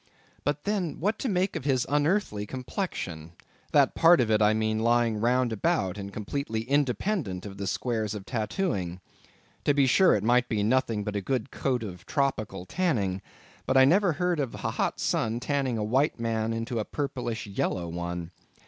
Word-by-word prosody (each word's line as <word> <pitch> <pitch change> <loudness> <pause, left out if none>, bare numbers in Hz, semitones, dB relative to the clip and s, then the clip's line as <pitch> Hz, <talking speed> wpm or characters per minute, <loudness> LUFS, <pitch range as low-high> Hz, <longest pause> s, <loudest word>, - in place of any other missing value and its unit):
But 145 +1 -1
then, 200 -6 -1
what 205 +6 0
to 260 - -1
make 190 0 0
of - - -3
his 130 -3 +1
unearthly 145 - +1
complexion, 100 - -5 0.4
that - - +4
part 170 +1 +6
of 115 -3 +2
it, 110 0 +3
I 105 0 +5
mean, 110 0 0
lying 115 -1 +2
round 120 +1 +2
about, 95 -3 0
and 100 0 -6
completely 110 +2 -3
independent 130 - 0
of 100 -1 -8
the 100 - -3
squares 110 +1 -1
of 100 -2 -7
tattooing. 105 - -2 0.6
To 145 - +2
be 140 -1 +4
sure, 185 +8 +5
it 105 - -1
might 125 +2 +3
be 105 -3 0
nothing 115 -2 +1
but 105 0 -4
a 100 - 0
good 130 +3 -2
coat 125 -4 -1
of 90 -4 -8
tropical 110 - -1
tanning; 105 - 0 0.5
but 130 - +3
I 130 - +8
never 180 +4 +4
heard 180 +1 0
of 135 -5 -2
a - - -3
hot - - -1
sun's 115 +1 0
tanning 135 -3 0
a 105 - -1
white 130 +6 +1
man 115 -1 -1
into 115 +1 -2
a - - 0
purplish 125 -4 -3
yellow 95 -3 -2
one. 85 0 -4
120 Hz, 185 wpm, -27 LUFS, 105-140 Hz, 0.6 s, I